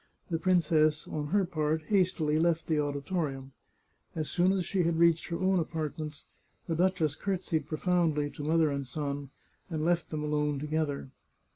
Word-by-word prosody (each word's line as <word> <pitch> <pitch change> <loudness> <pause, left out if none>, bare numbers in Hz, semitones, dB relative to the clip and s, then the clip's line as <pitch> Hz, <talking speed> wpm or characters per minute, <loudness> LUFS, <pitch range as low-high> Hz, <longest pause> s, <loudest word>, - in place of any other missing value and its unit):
The 165 - 0
princess, 155 -4 +3
on 150 -1 -3
her 200 +4 +2
part, 155 -2 -1
hastily 175 -5 +2
left 165 0 +2
the 155 -2 +1
auditorium. 140 -2 -2 0.6
As 155 -2 -3
soon 180 +1 +3
as 190 -2 0
she 195 - 0
had 170 -1 +1
reached 170 -1 +4
her 170 - -3
own 190 0 +3
apartments 155 -2 -4 0.4
the 165 - -1
duchess 170 -4 +1
courtesied 175 -6 -2
profoundly 155 -3 +1
to 145 - -7
mother 160 0 +3
and 140 -1 -3
son, 140 0 -4 0.4
and 155 -2 -2
left 170 0 +1
them 150 -1 -3
alone 150 -1 0
together. 150 -2 -2
155 Hz, 160 wpm, -30 LUFS, 150-175 Hz, 0.6 s, reached